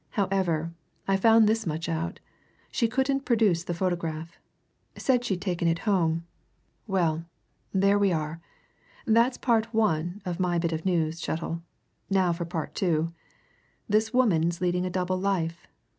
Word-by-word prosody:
However, 180 -5 0 0.3
I 195 - +3
found 225 +3 +6
this 220 -2 +1
much 160 +1 -2
out 165 +3 -3 0.5
she 235 - +2
couldn't 265 +3 +1
produce 210 -9 +2
the 175 - -3
photograph. 170 -2 -3 0.6
Said 250 -2 +2
she'd 190 -7 -2
taken 175 -3 0
it 165 0 +2
home. 165 -5 +1 0.6
Well 170 -5 0 0.5
there 200 +1 +3
we 200 -2 +3
are! 160 0 -2 0.6
That's 235 +3 +3
part 230 -2 +1
one 175 -4 +1
of 180 -1 -3
my 180 -2 +1
bit 170 0 0
of 160 +1 -3
news, 165 -2 0
Chettle. 165 +1 -3 0.5
Now 190 -3 +3
for 170 0 -4
part 165 -2 -4
two. 165 -3 0 0.7
This 220 +1 +2
woman's 175 -9 +2
leading 180 0 0
a - - -2
double 185 0 -1
life. 175 -4 -1
180 Hz, 145 wpm, -27 LUFS, 165-205 Hz, 0.7 s, found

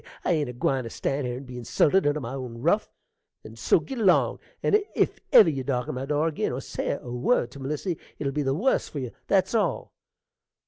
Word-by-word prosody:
I - - +2
ain't 150 -6 +1
a - - -6
gwine 130 +1 0
to - - -5
stan' 135 +4 -2
here 125 0 -3
and 135 - -9
be 125 -1 -8
insulted 145 +8 +2
under 145 +1 +1
my 125 -2 -6
own 125 -3 -6
ruff; 205 +7 +2 0.5
and - - -11
so - - +3
git 270 -3 -6
along; 195 -5 +3 0.2
and 420 0 +4
if - - +1
ever 210 - +9
you 135 -4 -1
darken 125 -3 -2
my 130 +1 -4
door 150 +1 +1
ag'in, 160 - -1
or - - -3
say - - -3
a 120 - -9
word 125 - +1
to 140 - -11
Melissy, 150 +6 -3 0.2
it'll 140 -2 -2
be 150 - 0
the 135 -1 0
wuss 240 - +1
for - - -7
you, 125 -4 -4 0.2
that's 195 +2 +2
all. 200 - 0
140 Hz, 225 wpm, -26 LUFS, 125-170 Hz, 0.5 s, ever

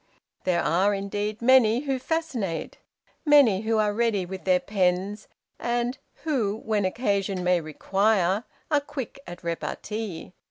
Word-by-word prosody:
There 175 -2 +2
are, 190 +5 +2
indeed, 205 +2 -3
many 245 -2 +5
who 270 -3 -1
fascinate; 255 - -3 0.4
many 280 - +5
who 225 0 0
are 210 -1 +2
ready 220 -4 +1
with 190 +1 -8
their 185 -1 +4
pens, 195 +1 0 0.3
and 240 +2 -1 0.2
who, 235 -10 0
when 210 -3 +1
occasion 195 -3 0
may 180 -1 +3
require, 195 +5 +1 0.3
are 295 -1 +4
quick 275 -2 -6
at 175 +1 -9
repartee. 180 +2 -4
205 Hz, 130 wpm, -26 LUFS, 185-240 Hz, 0.4 s, many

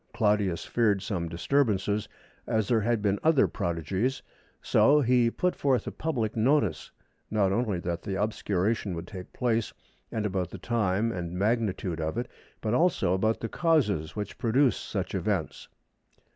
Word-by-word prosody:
Claudius 105 -5 +1
feared 105 -5 +1
some 90 -5 -3
disturbance, 105 +3 +1 0.6
as 110 -2 +1
there 115 -2 +2
had 115 0 0
been 100 -1 +1
other 155 -4 +4
prodigies, 95 - -2 0.4
so 150 +1 +4
he 125 -2 +3
put 180 +9 -1
forth 135 -3 +1
a - - -4
public 120 -9 -2
notice, 110 - +1 0.4
not 100 -3 +2
only 105 -2 0
that 85 -1 -3
the 95 -2 -3
obscuration 105 -1 -1
would 85 +1 -5
take 90 -1 -9
place 115 -3 0 0.4
and 110 -2 -2
about 95 -4 -1
the - - -8
time 110 -1 0
and 85 -4 -4
magnitude 100 -5 0
of 80 +6 -2
it, 120 +1 -2 0.3
but 110 0 -1
also 160 - +2
about 110 +4 +1
the 115 - -2
causes 115 - +1
which 105 -1 -5
produce 125 +3 +3
such - - -4
events." - - -2
105 Hz, 155 wpm, -28 LUFS, 95-120 Hz, 0.6 s, other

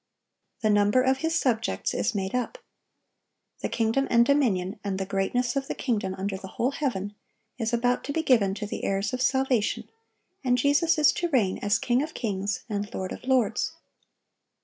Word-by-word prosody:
The 215 -1 +3
number 205 +4 +4
of 265 0 +2
His 325 +3 0
subjects 230 -3 0
is - - -1
made 190 -1 -2
up; 250 - -2 1.0
"the - - -3
kingdom 230 +4 +1
and 235 0 +5
dominion, 215 -9 +1
and 195 -2 -2
the 190 - -2
greatness 220 +6 0
of 270 -1 -1
the - - -3
kingdom 205 -7 -1
under 195 0 -2
the 190 - -9
whole 240 +7 -1
heaven," 210 -9 -2 0.5
is 225 -1 -1
about 245 +1 +1
to - - -3
be 320 +2 -1
given 215 -9 +3
to 210 0 -4
the 205 - -5
heirs 195 +4 -1
of 255 - -2
salvation, 265 -4 +1 0.6
and 250 -1 +2
Jesus 295 +6 +3
is 300 -1 +6
to 345 - -1
reign 220 - +1
as 205 0 +2
King 245 +1 +1
of 310 +2 -5
kings, 200 -3 -2
and 205 -2 -3
Lord 185 0 -3
of - - -8
lords. 255 -4 +1
235 Hz, 185 wpm, -26 LUFS, 200-265 Hz, 1.0 s, is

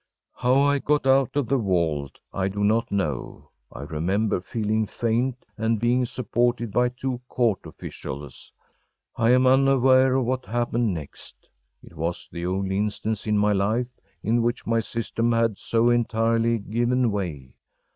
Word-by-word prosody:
How 125 +1 +1
I 140 +1 +3
got 150 0 +1
out 135 0 +3
of 140 -5 +1
that 135 - +3
vault, 85 - -1
I 95 -1 0
do 100 +1 -3
not 110 +3 +1
know. 80 -10 -3 0.2
I - - -9
remember 90 +7 -1
feeling 110 +1 -1
faint, 120 +4 -1
and 110 0 +1
being 120 +2 +2
supported 120 -1 -1
by 125 +3 +2
two 125 0 -4
court 115 -6 0
officials. 70 -1 -8 0.6
I 115 -1 +2
am 125 +1 +5
unaware 130 0 +4
of 130 -2 +1
what 130 +1 -2
happened 120 0 0
next. 80 -5 -9 0.4
It - - -15
was 85 +2 -3
the 85 +1 -4
only 95 +1 -1
instance 105 +1 -2
in 105 -1 +2
my 105 0 +3
life 110 +5 0 0.3
in 115 +2 +2
which 120 +1 -1
my 115 0 +1
system 115 +1 -2
had 115 -3 +1
so 115 +1 +2
entirely 115 0 +1
given 120 +3 0
way. 80 -11 -4
115 Hz, 155 wpm, -24 LUFS, 100-125 Hz, 0.6 s, am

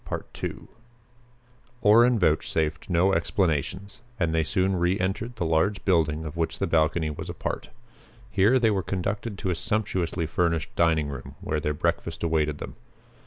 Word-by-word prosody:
Orrin 115 +3 +6
vouchsafed 80 -2 0
no 90 +2 +3
explanations 95 - -1 0.2
and 85 -3 +1
they 80 0 +2
soon 95 +3 +1
reentered 95 +6 -1
the 95 -6 -2
large 80 +6 +1
building 80 -4 +2
of 75 - -6
which 85 -1 -1
the - - 0
balcony 80 0 +1
was 75 - -7
a - - -5
part. - - -4 0.6
Here 105 +6 +4
they 115 -3 +3
were 100 -2 +1
conducted 100 +4 -3
to 95 - -1
a - - 0
sumptuously 90 -3 -1
furnished 85 0 -1
dining 80 -3 +2
room 70 -3 -8
where 75 - -2
their 75 0 -1
breakfast 85 0 -2
awaited 75 -3 +1
them. - - -8
85 Hz, 150 wpm, -26 LUFS, 80-95 Hz, 0.6 s, Orrin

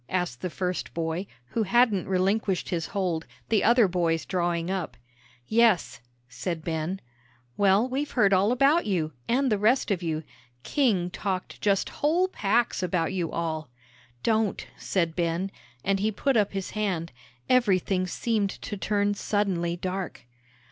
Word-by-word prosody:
asked 175 -10 -2
the 180 - -2
first 180 +1 -3
boy, 165 +3 -2 0.2
who 225 - -1
hadn't 220 -2 +3
relinquished 190 +1 +1
his 165 -3 -1
hold, 175 -5 -2 0.2
the 215 -3 +3
other 235 -2 +5
boys 170 -3 0
drawing 175 -2 -1
up. 190 -4 -3 0.5
"Yes," 220 - +3 0.3
said 155 +7 -4
Ben. 165 +3 -2 0.6
"Well, 200 +4 +4
we've 275 +3 -2
heard 200 -1 +3
all 195 +4 +4
about 275 +6 +3
you, 160 -6 0
and 260 +1 +2
the 210 - +2
rest 230 +2 +3
of 190 -3 0
you. 160 -2 -2 0.4
King 200 -11 +1
talked 190 -1 -4
just 200 -2 +2
whole 335 +5 +3
packs 230 - +1
about 180 -2 0
you 175 -4 -2
all." 160 -4 -3 0.5
"Don't," 220 -3 +1
said 170 -4 -1
Ben, 175 +3 -1 0.3
and 195 0 +1
he 215 +2 +1
put 270 +6 0
up 210 -3 +2
his 195 -1 -3
hand; 185 -6 -2 0.4
everything 190 -6 +2
seemed 215 +1 0
to 205 - -4
turn 205 +1 +1
suddenly 190 -5 -1
dark. 185 -5 -4
190 Hz, 150 wpm, -27 LUFS, 175-215 Hz, 0.6 s, other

